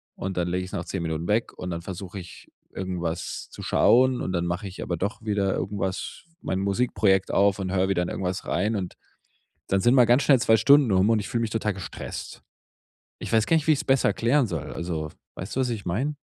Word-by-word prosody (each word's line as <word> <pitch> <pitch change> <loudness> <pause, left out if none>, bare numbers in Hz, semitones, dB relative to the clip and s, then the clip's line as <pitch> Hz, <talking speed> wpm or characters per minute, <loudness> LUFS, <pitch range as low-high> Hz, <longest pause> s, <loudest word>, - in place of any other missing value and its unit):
und 95 -1 -5
dann 90 - 0
lege 90 +1 -1
ich 90 - -8
es - - -15
nach 90 -4 -4
10 90 -3 -4
Minuten 80 +1 -3
weg 110 +3 +1
und 90 - -7
dann 85 -1 -4
versuche 95 +1 -7
ich 90 -2 -10 0.3
irgendwas 85 -3 -4
zu - - -11
schauen 130 +1 +4
und - - -2
dann 85 -1 -1
mache 90 +3 -3
ich 95 - -9
aber 85 - -2
doch 100 +6 -3
wieder 100 -3 0
irgendwas 95 -1 -3 0.2
mein 95 - -2
Musikprojekt 100 -1 +1
auf 100 0 +3
und 95 -1 -3
höre 95 0 +2
wieder 90 -2 +1
in - - -3
irgendwas 90 0 -3
rein 95 - 0
und 90 -3 -5 0.7
dann 95 - +1
sind 120 +7 +4
mal 125 - +7
ganz 120 +4 +4
schnell 140 -2 +5
2 110 +1 +5
Stunden 140 0 +5
um 95 +3 +4
und 115 - +4
ich 105 - -4
fühle 115 - -1
mich 115 - -2
total 110 -2 -1
gestresst. 95 - -7 0.7
Ich - - -7
weiß 110 -1 +3
gar 165 - +3
nicht, 160 -2 0
wie 155 - +6
ich's 150 0 0
besser 135 -1 +3
erklären 125 +3 +2
soll. 80 -7 -5
Also 80 -3 -4 0.2
weißt 90 - -6
du, 135 - +1
was 125 - 0
ich 110 -5 -4
meine? 130 - -1
95 Hz, 230 wpm, -25 LUFS, 90-115 Hz, 0.7 s, mal